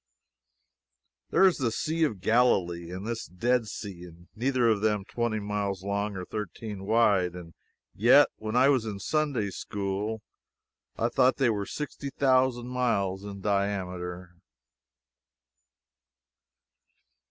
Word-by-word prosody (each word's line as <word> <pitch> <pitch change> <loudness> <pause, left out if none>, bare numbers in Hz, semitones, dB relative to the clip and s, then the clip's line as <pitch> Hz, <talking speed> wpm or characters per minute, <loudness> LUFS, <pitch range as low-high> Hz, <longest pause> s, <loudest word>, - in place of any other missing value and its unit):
There - - +3
is 185 - +4
the 130 -5 0
Sea 160 +7 -1
of 105 -11 -4
Galilee 90 -7 +2
and 90 +3 -6
this 115 0 -4
Dead 115 +6 0
Sea 90 -5 -7 0.3
neither 125 +1 +1
of 110 -3 +2
them 105 -2 +1
twenty 120 -1 -2
miles 100 -2 -3
long 100 +1 -2
or 90 - -5
thirteen 105 0 -6
wide. 100 -6 +3
And 85 -2 -10 0.4
yet 125 +7 +6
when 110 +1 -4
I 130 +2 +5
was 130 -5 +3
in 105 -3 -5
Sunday 130 -3 -1
School 100 +3 -4 0.7
I - - +1
thought 130 +1 +3
they 130 -4 +3
were 100 -2 -3
sixty 150 -1 -5
thousand 130 -3 +2
miles 100 -7 0
in 100 -1 -8
diameter. 90 -3 -2
105 Hz, 125 wpm, -28 LUFS, 95-120 Hz, 0.7 s, yet